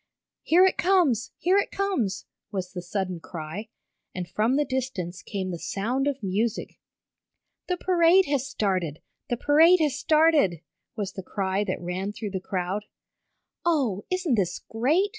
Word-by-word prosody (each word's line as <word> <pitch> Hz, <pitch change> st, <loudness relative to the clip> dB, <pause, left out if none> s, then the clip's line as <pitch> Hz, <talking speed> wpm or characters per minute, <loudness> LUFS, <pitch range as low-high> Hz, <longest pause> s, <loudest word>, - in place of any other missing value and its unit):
"Here 355 Hz, +3 st, +5 dB
it 380 Hz, -, +1 dB
comes! 340 Hz, -, +3 dB
Here 375 Hz, +3 st, +3 dB
it -, -, -1 dB
comes!" 285 Hz, -, -1 dB, 0.3 s
was 185 Hz, -2 st, -4 dB
the 180 Hz, -, -4 dB
sudden 185 Hz, 0 st, -3 dB
cry, 165 Hz, +7 st, -7 dB, 0.5 s
and 180 Hz, -2 st, -4 dB
from 220 Hz, +8 st, +1 dB
the 295 Hz, +1 st, +2 dB
distance 250 Hz, -10 st, -3 dB
came 190 Hz, -2 st, -4 dB
the 170 Hz, -, -5 dB
sound 245 Hz, +11 st, -1 dB
of 275 Hz, -5 st, -2 dB
music. 205 Hz, +4 st, -2 dB, 0.9 s
"The 360 Hz, -, 0 dB
parade 360 Hz, +1 st, +4 dB
has 280 Hz, -3 st, 0 dB
started! 185 Hz, -, -1 dB, 0.3 s
The 240 Hz, -, 0 dB
parade 320 Hz, +7 st, +6 dB
has 300 Hz, -4 st, +1 dB
started!" 305 Hz, -, +3 dB, 0.3 s
was 205 Hz, -3 st, -3 dB
the 190 Hz, -, -6 dB
cry 190 Hz, +1 st, -1 dB
that 185 Hz, -, -2 dB
ran 185 Hz, +3 st, -3 dB
through 210 Hz, -1 st, -5 dB
the 190 Hz, -, -2 dB
crowd. 185 Hz, +2 st, -3 dB, 0.8 s
"Oh, 265 Hz, -, +1 dB
isn't 365 Hz, -6 st, 0 dB
this 185 Hz, -5 st, +1 dB
great!" 300 Hz, -, +2 dB
220 Hz, 155 wpm, -26 LUFS, 190-310 Hz, 0.9 s, parade